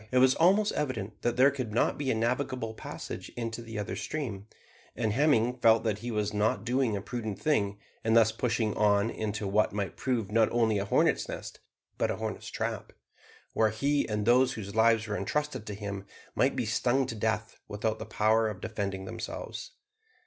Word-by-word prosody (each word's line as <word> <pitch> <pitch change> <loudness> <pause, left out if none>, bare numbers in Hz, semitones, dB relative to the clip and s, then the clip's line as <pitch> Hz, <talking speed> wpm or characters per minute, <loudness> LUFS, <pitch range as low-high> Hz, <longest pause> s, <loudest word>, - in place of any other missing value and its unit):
It 130 - +2
was 130 0 +6
almost 195 +5 +4
evident 120 -8 -3
that 120 0 0
there 135 +3 +6
could 130 -5 -4
not - - +2
be 140 -2 -2
a - - +2
navigable 120 0 -1
passage - - -7
into 115 0 -3
the 115 -2 -7
other 105 -2 -3
stream, 110 -3 -4 0.5
and 110 -3 0
Hemming 125 -3 +3
felt 115 -1 +5
that 105 -3 -1
he 120 +2 -5
was 105 -2 -1
not 105 +1 +1
doing 120 -3 +1
a 100 - -6
prudent 110 -4 -4
thing 100 -10 +1 0.3
in 110 0 +2
thus 110 -1 +6
pushing 115 -2 0
on 105 +1 +3
into 105 -1 -3
what 105 +1 +2
might 100 -4 -3
prove 120 -6 -1
not 110 0 +3
only 110 -3 +2
a 100 - -2
hornets' - - +2
nest, - - -7 0.4
but - - +2
a - - 0
hornets' - - -5
trap, - - -4 0.6
where 110 -1 +3
he 140 +7 0
and 105 -1 -1
those 125 +2 +4
whose 100 -2 -6
lives 110 0 +4
were 105 - -2
entrusted 145 -3 -2
to 105 - -4
him 100 -1 -6 0.3
might - - +2
be - - -1
stung 130 +2 +1
to 120 - -4
death 110 0 -2
without 110 +2 -2
the - - -5
power 110 +1 +2
of 100 -3 -6
defending 100 -2 -4
themselves. - - -6
110 Hz, 190 wpm, -29 LUFS, 105-125 Hz, 0.6 s, was